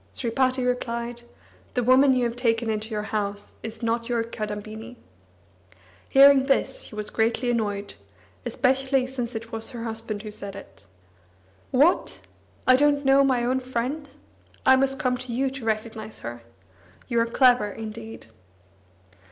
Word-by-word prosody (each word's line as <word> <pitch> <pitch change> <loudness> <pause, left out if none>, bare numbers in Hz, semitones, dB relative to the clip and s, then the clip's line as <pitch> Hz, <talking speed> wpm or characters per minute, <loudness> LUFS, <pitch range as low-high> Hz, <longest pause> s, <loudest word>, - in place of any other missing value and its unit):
Sripati 255 +1 0
replied: 240 -1 -2 0.5
"The 245 - +1
woman 260 +3 +6
you 250 - +1
have 235 -1 -1
taken 230 -2 +1
into 215 +1 -3
your 210 -2 -3
house 205 -1 -3
is 225 +2 -7
not 230 +1 -1
your 235 -1 +1
Kadambini." 220 +1 -6 1.1
Hearing 275 0 +7
this, 285 - +1
she - - -11
was 210 0 -4
greatly 230 +2 +1
annoyed, 205 -3 -2 0.5
especially 265 0 +1
since 250 -2 -5
it 225 +1 -6
was 225 0 -4
her 240 -3 -6
husband 225 -2 -4
who 215 - -7
said 200 -1 -7
it. 100 - -13 0.8
"What! 295 +8 +2 0.5
I 255 - +7
don't 290 0 +3
know 270 +1 +6
my 255 -3 +2
own 255 +2 +1
friend? 260 +4 -3 0.6
I 265 - +7
must 270 0 +1
come 255 -4 0
to 255 -1 -7
you 260 +3 0
to 270 -3 -7
recognise 220 0 -3
her! 120 +1 -7 0.7
You 235 -2 +1
are 230 - +2
clever, 245 -3 +4
indeed!" 220 +1 -8
235 Hz, 150 wpm, -25 LUFS, 220-260 Hz, 1.1 s, Hearing